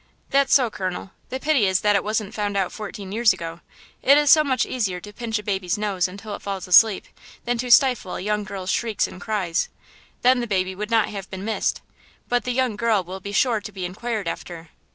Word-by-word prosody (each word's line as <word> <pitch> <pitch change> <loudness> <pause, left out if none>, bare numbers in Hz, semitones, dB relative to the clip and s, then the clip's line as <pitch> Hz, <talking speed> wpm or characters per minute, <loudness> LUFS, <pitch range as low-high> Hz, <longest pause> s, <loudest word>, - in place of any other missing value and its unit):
"That's 275 0 +3
so, 250 -5 +4
colonel–the 190 +7 -6
pity 290 -9 +3
is 190 0 +1
that 210 -1 +3
it 200 - +2
wasn't 215 -1 -2
found 205 -1 -2
out 190 -2 0
fourteen 205 -2 -7
years 225 +1 +4
ago. 165 0 -7 0.4
It 280 +2 +6
is 295 -1 +4
so 310 - +7
much 260 -4 +1
easier 200 -8 -2
to 205 +3 -11
pinch 225 0 -3
a 210 - -6
baby's 190 -3 -1
nose 200 -4 0
until 200 +3 -8
it - - -7
falls 195 -2 -5
asleep 200 +3 +6 0.4
than 240 -1 -1
to 250 +1 -3
stifle 245 -6 +4
a - - -4
young 210 +2 -1
girl's 190 -1 -4
shrieks 225 -4 0
and 185 - -11
cries–then 215 +5 -1
the 240 - -2
baby 190 -2 0
would 210 +3 -5
not 225 -2 +2
have 195 -2 -7
been 190 +1 -6
missed–but 240 +2 -3
the 250 - -1
young 250 -3 0
girl 220 -4 +2
will 185 +2 -7
be 200 +2 -7
sure 225 0 +2
to 210 - -8
be 190 -2 -5
inquired 210 +2 -4
after." 165 -1 -6
210 Hz, 215 wpm, -23 LUFS, 190-235 Hz, 0.4 s, so